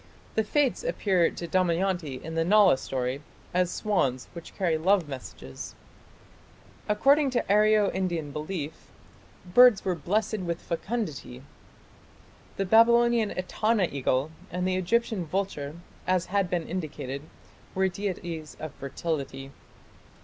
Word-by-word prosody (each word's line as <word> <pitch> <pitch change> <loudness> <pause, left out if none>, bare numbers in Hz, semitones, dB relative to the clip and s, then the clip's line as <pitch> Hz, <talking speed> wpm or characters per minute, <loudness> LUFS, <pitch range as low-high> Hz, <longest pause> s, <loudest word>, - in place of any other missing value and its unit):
The 220 - +2
"Fates" 285 - +1
appear 195 - +2
to 170 - -7
Damayanti 175 -5 0
in 160 - -6
the 165 0 +1
Nala 195 -5 +5
story 130 +1 -3 0.3
as 180 0 +2
swans 135 -13 -1
which 170 -2 -10
carry 175 -5 +1
love 180 +1 +2
messages. 125 - -8 1.1
According 275 +7 +4
to 250 -2 0
Aryo 210 0 +4
Indian 175 -6 -2
belief, 155 0 -5 0.7
birds 245 -3 +7
were 185 - +1
"blessed 210 +6 -1
with 170 -2 -3
fecundity". 165 - -4 1.1
The 195 - 0
Babylonian 235 +1 +5
Etana 195 +2 +1
eagle 135 +1 0 0.2
and 180 +2 -2
the 185 - +1
Egyptian 215 +1 0
vulture, 155 -5 -3 0.3
as 185 -1 +2
has 200 -2 +2
been 175 -2 -2
indicated, 155 -6 -4 0.5
were 190 0 +3
deities 175 -4 -5
of 155 -2 -6
fertility. 140 -1 -4
180 Hz, 120 wpm, -27 LUFS, 155-205 Hz, 1.1 s, birds